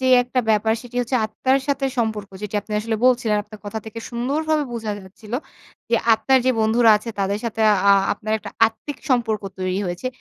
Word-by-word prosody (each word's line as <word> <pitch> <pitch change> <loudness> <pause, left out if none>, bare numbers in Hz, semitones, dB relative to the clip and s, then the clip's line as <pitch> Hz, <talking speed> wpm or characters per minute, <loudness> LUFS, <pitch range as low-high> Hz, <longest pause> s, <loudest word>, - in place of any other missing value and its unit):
যে 260 - 0 0.2
একটা 250 +1 -1
ব্যাপার 220 +1 +3
সেটি 245 0 -10
হচ্ছে 245 +1 0
আত্মার 260 +5 +1
সাথে 275 -1 0
সম্পর্ক। 220 -3 -1
যেটি 210 0 -6
আপনি 215 - -10
আসলে 220 +1 -2
বলছিলেন। 240 -4 +3
আপনার 210 0 -13
কথা 205 +2 -4
থেকে 220 +1 -7
সুন্দরভাবে 295 +5 0
বোঝা 225 -2 -3
যাচ্ছিল। 205 +3 -14 0.6
যে 235 - +4 0.2
আত্মার 225 +4 +3
যে - - +5
বন্ধুরা 225 +1 +4
আছে 220 +2 -6
তাদের 200 +1 0
সাথে 225 -1 -3 0.3
আ - - +9 0.2
আপনার 215 +1 -4
একটা - - -9 0.2
আত্মিক 250 +5 -7
সম্পর্ক 225 -4 +1 0.2
তৈরি 185 +1 -1
হয়েছে। 175 +7 -4
225 Hz, 190 wpm, -22 LUFS, 210-250 Hz, 0.6 s, আ